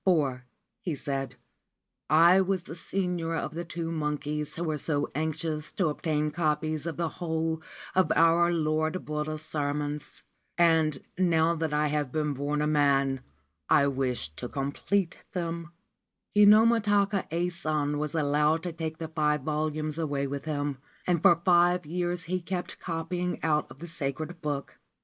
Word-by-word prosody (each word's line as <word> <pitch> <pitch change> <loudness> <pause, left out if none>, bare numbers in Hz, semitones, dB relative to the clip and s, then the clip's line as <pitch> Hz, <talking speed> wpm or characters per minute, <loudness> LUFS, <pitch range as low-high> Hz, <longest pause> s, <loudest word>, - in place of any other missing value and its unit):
* - - -50
For,7 145 -9 +2 0.4
he 175 -9 -2
said, 135 -2 -3
c - - -26 0.7
I 170 +4 +7
was 190 -1 0
the 165 - -8
senior 175 -1 -2
of 160 - -3
the 170 +2 -3
two 165 -1 -4
monkeys 150 -1 -2
who 170 - -3
were 155 -3 -1
so 145 0 0
anxious 155 0 -2
to 185 -5 +1
obtain 150 0 -1
copies 155 -1 -1
of 165 - -4
the 170 -1 0
whole 160 -2 -1 0.3
of 185 -4 +3
our 165 +1 +5
Lord 155 +1 0
Buddha's 150 0 -3
sermons; 145 -1 -3 0.3
and, 160 -4 +3 0.2
now 165 -2 +3
that 160 -2 -2
I 150 0 +2
have 145 -3 -1
been 150 0 0
born 145 +2 -1
a - - +2
man, 140 -3 +2 0.5
I 140 - +5
wish 130 - -1
to 125 - -5
complete 165 +7 -1
them/ 170 -2 -3 0.7
Kinomi 215 +3 +7
ta 205 -1 +3
ka 195 -1 -2
Ason 155 -4 -1
was 150 +1 -2
allowed 150 +1 +2
to 175 -2 -3
take 160 -1 -4
the 165 - -4
five 150 -2 +1
volumes 155 0 -2
away 145 -3 -1
with 140 +1 -4
him, 145 -3 -2 0.3
and 175 -3 +1
for 170 -1 +6
five 175 -1 +4
years 175 +2 -2
he 185 +2 -2
kept 180 +1 -4
copying 175 +1 -3
out 150 -4 0
the 165 - -8
sacred 160 +1 -4
book. 145 -2 -4
155 Hz, 160 wpm, -28 LUFS, 150-170 Hz, 0.7 s, I